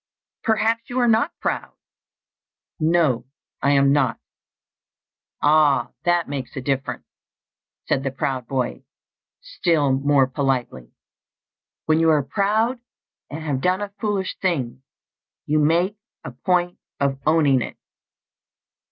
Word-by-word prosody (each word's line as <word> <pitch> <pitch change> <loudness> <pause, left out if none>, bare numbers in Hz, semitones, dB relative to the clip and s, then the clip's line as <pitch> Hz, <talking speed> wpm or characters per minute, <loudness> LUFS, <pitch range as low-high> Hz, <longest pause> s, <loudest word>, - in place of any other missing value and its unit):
"Perhaps 225 +1 +1
you 245 - -4
are 245 -1 +3
not 230 +7 +3
proud?" - - -3 1.1
"No, 155 -7 +2 0.3
I 140 - +2
am 140 0 +4
not." 145 -4 +1 1.2
"Ah, 150 -1 +4
that 175 -1 +2
makes 140 -3 -5
a - - -3
difference," 135 +1 -2 0.8
said 135 - 0
the 135 - -2
proud 130 -2 -3
boy, 130 0 -2 0.6
still 170 - +1
more 140 0 +3
politely. 130 - -2 0.9
"When 155 0 +3
you 165 0 +4
are 150 -3 +3
proud, 215 - 0 0.5
and 155 +2 -6
have 140 -4 -2
done 185 +4 +1
a 205 -1 -5
foolish 205 -3 -1
thing, 135 -10 -1 0.6
you 155 +1 +1
make 170 +7 +2 0.3
a - - -6
point 175 +7 0 0.2
of 140 -1 0
owning 150 -5 +4
it." - - -6
150 Hz, 120 wpm, -22 LUFS, 135-185 Hz, 1.2 s, am